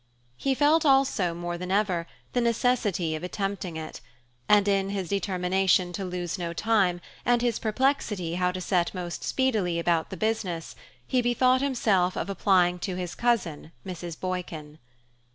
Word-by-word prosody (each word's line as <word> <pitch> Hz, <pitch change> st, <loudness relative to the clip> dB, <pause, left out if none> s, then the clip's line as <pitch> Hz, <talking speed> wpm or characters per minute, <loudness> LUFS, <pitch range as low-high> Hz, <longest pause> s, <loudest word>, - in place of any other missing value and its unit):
He 270 Hz, -, 0 dB
felt 300 Hz, +4 st, +4 dB
also, 270 Hz, -, +3 dB
more 175 Hz, 0 st, -4 dB
than 180 Hz, 0 st, -5 dB
ever, 190 Hz, -4 st, +1 dB, 0.3 s
the 245 Hz, -, +2 dB
necessity 230 Hz, -8 st, +1 dB
of 155 Hz, -, -4 dB
attempting 195 Hz, -2 st, -3 dB
it; 155 Hz, -1 st, -7 dB, 0.5 s
and 205 Hz, -1 st, +5 dB
in 195 Hz, -1 st, +2 dB
his 195 Hz, -3 st, -3 dB
determination 185 Hz, -2 st, +1 dB
to 195 Hz, -, -4 dB
lose 180 Hz, 0 st, -4 dB
no 170 Hz, -1 st, -3 dB
time, 195 Hz, -3 st, +2 dB, 0.2 s
and 240 Hz, 0 st, +2 dB
his 240 Hz, -2 st, +1 dB
perplexity 215 Hz, -, 0 dB
how 180 Hz, 0 st, +1 dB
to 185 Hz, -, -4 dB
set 180 Hz, 0 st, 0 dB
most 175 Hz, -1 st, -5 dB
speedily 215 Hz, -10 st, 0 dB
about 170 Hz, -1 st, +1 dB
the 190 Hz, -, -7 dB
business, 190 Hz, -6 st, -2 dB, 0.3 s
he 255 Hz, -, +1 dB
bethought 255 Hz, +2 st, +3 dB
himself 210 Hz, -10 st, +1 dB
of 200 Hz, -, -2 dB
applying 180 Hz, -3 st, +3 dB
to 185 Hz, 0 st, -3 dB
his 180 Hz, -1 st, -4 dB
cousin 185 Hz, -10 st, -1 dB
Mrs. 175 Hz, -3 st, -6 dB
Boykin. 165 Hz, -5 st, -5 dB
185 Hz, 155 wpm, -27 LUFS, 175-225 Hz, 0.5 s, and